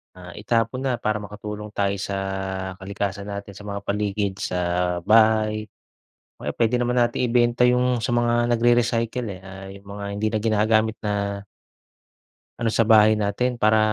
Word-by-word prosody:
ah, 90 Hz, -1 st, -11 dB
itapon 115 Hz, +3 st, 0 dB
na, 130 Hz, -2 st, +1 dB
para 110 Hz, -2 st, -1 dB
makatulong 105 Hz, +1 st, -7 dB
tayo 100 Hz, 0 st, +1 dB
sa 100 Hz, 0 st, -3 dB, 0.6 s
kalikasan 100 Hz, +1 st, -4 dB
natin, 100 Hz, 0 st, -6 dB
sa 105 Hz, -, -11 dB
mga 100 Hz, 0 st, -4 dB
paligid, 100 Hz, -1 st, -1 dB
sa 90 Hz, -, -2 dB, 0.5 s
bahay. 110 Hz, 0 st, +3 dB, 0.7 s
O -, -, -10 dB
kaya -, -, -2 dB
pwede 115 Hz, +1 st, +2 dB
naman 125 Hz, 0 st, 0 dB
nating 120 Hz, +1 st, +1 dB
ibenta 120 Hz, 0 st, +3 dB
yung 125 Hz, 0 st, +2 dB
sa 120 Hz, +1 st, -1 dB
mga 120 Hz, 0 st, +2 dB
nagrere-recycle 120 Hz, 0 st, +1 dB
eh, 90 Hz, -, -12 dB
ah, 95 Hz, 0 st, -10 dB
yung 100 Hz, 0 st, -14 dB
mga 100 Hz, -, -5 dB
hindi 105 Hz, +2 st, -1 dB
na 110 Hz, -, 0 dB
ginagamit 110 Hz, 0 st, +2 dB
na 100 Hz, -1 st, -2 dB, 1.2 s
ano 115 Hz, -1 st, +1 dB
sa -, -, +3 dB
bahay 110 Hz, -1 st, +7 dB
natin. 105 Hz, +4 st, 0 dB
Para 110 Hz, +1 st, +4 dB
110 Hz, 160 wpm, -23 LUFS, 100-120 Hz, 1.2 s, bahay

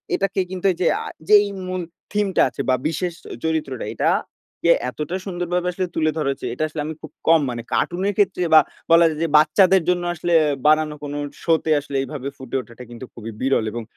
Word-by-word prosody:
এটাকে 195 Hz, 0 st, -1 dB
কিন্তু 185 Hz, 0 st, -6 dB
এইযে 175 Hz, 0 st, 0 dB, 0.2 s
আ -, -, -9 dB, 0.2 s
যেই 210 Hz, -1 st, +7 dB, 0.2 s
মূল 185 Hz, 0 st, -3 dB, 0.3 s
থিমটা 205 Hz, -2 st, +1 dB
আছে -, -, -5 dB
বা 130 Hz, -, +5 dB
বিশেষ 170 Hz, +2 st, -2 dB, 0.3 s
চরিত্রটা 155 Hz, -6 st, -2 dB
এটা -, -, +1 dB, 0.6 s
যে 170 Hz, -, +6 dB, 0.2 s
এতটা 150 Hz, +7 st, -4 dB
সুন্দরভাবে 180 Hz, -1 st, -2 dB
আসলে 185 Hz, +1 st, -2 dB
তুলে 155 Hz, -1 st, +2 dB
ধরা 150 Hz, -3 st, 0 dB
হয়েছে। 135 Hz, -, -4 dB
এটা 155 Hz, -, -2 dB
আসলে 155 Hz, -1 st, -5 dB
আমি 160 Hz, -, -4 dB
খুব -, -, -10 dB, 0.2 s
কম 165 Hz, 0 st, +6 dB
মানে, 120 Hz, -1 st, -4 dB
কার্টুনের 190 Hz, +4 st, 0 dB
ক্ষেত্রে 190 Hz, -3 st, +2 dB
বা 155 Hz, -, +10 dB, 0.3 s
বলা 170 Hz, 0 st, +7 dB
যায় 155 Hz, -1 st, -5 dB
যে -, -, +1 dB
বাচ্চাদের 185 Hz, +5 st, +5 dB
জন্য 175 Hz, -1 st, +1 dB
আসলে 175 Hz, +1 st, -1 dB, 0.3 s
বানানো 155 Hz, 0 st, +3 dB
কোনো 145 Hz, 0 st, -4 dB, 0.3 s
শোতে 160 Hz, -1 st, +1 dB
আসলে 140 Hz, -1 st, -8 dB
এভাবে 135 Hz, 0 st, -6 dB
ফুটে 130 Hz, -1 st, -7 dB
ওঠাটা 120 Hz, 0 st, -13 dB
কিন্তু 120 Hz, +2 st, -9 dB
খুবই 115 Hz, -1 st, -8 dB
বিরল 130 Hz, -4 st, +1 dB
এবং 120 Hz, +1 st, -5 dB
160 Hz, 195 wpm, -21 LUFS, 140-180 Hz, 0.6 s, বা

